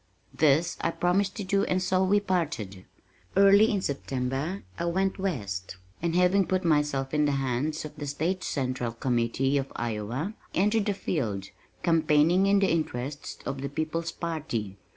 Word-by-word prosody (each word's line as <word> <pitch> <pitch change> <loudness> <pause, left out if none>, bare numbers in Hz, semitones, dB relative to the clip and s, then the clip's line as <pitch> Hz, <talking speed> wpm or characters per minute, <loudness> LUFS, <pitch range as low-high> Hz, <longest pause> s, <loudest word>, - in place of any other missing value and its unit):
This 155 +4 +3
I - - +1
promised 185 +4 +1
to 205 - -4
do 195 +1 +1
and 185 - +1
so 185 0 +1
we 200 +2 +4
parted. 150 - -2 0.5
Early 200 +2 +7
in 200 -3 0
September 135 +5 -2 0.2
I - - -1
went 190 +3 0
west 100 - -3 0.2
and 170 0 0
having 180 +2 +4
put 185 -1 0
myself 145 -4 +1
in 150 0 +3
the 145 - +1
hands 135 +4 -1
of 150 - -9
the 145 -1 -5
State 170 +6 -1
Central 130 -4 -2
Committee 125 +3 +1
of 135 - -5
Iowa, 120 - -3 0.2
entered 210 +3 +2
the 205 - +1
field, 105 - -2 0.3
campaigning 165 +3 +4
in 200 0 +4
the 195 -1 +3
interests 145 -3 -3
of 135 -1 -3
the 140 - -3
People's 160 +3 -2
Party. 125 - -4
155 Hz, 160 wpm, -27 LUFS, 135-185 Hz, 0.5 s, Early